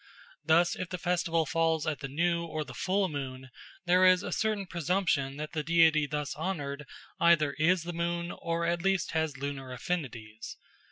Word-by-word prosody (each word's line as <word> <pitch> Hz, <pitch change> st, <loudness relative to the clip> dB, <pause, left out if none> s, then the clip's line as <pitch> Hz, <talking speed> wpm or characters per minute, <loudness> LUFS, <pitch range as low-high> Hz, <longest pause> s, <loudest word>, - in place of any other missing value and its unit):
Thus, 165 Hz, +3 st, +3 dB
if 185 Hz, -2 st, -5 dB
the 180 Hz, -, -4 dB
festival 170 Hz, -2 st, 0 dB
falls 160 Hz, -1 st, +1 dB
at 155 Hz, -2 st, -2 dB
the 135 Hz, -, -5 dB
new 170 Hz, +4 st, 0 dB
or 155 Hz, -2 st, -3 dB
the -, -, -11 dB
full 190 Hz, +1 st, 0 dB
moon, 130 Hz, -4 st, -6 dB, 0.3 s
there 180 Hz, +1 st, +4 dB
is 185 Hz, 0 st, +6 dB
a -, -, -4 dB
certain 215 Hz, -2 st, 0 dB
presumption 170 Hz, -6 st, 0 dB
that 150 Hz, +1 st, -5 dB
the 155 Hz, -, -1 dB
deity 160 Hz, -1 st, +4 dB
thus 150 Hz, 0 st, -3 dB
honoured 150 Hz, -4 st, -4 dB, 0.3 s
either 155 Hz, -4 st, +4 dB
is 170 Hz, +2 st, +3 dB
the 175 Hz, +1 st, -5 dB
moon 170 Hz, +1 st, -2 dB
or 170 Hz, 0 st, -2 dB
at 170 Hz, 0 st, 0 dB
least 195 Hz, 0 st, +1 dB
has 160 Hz, -3 st, -1 dB
lunar 135 Hz, -1 st, -5 dB
affinities. 120 Hz, -6 st, -5 dB
165 Hz, 175 wpm, -30 LUFS, 145-175 Hz, 0.3 s, is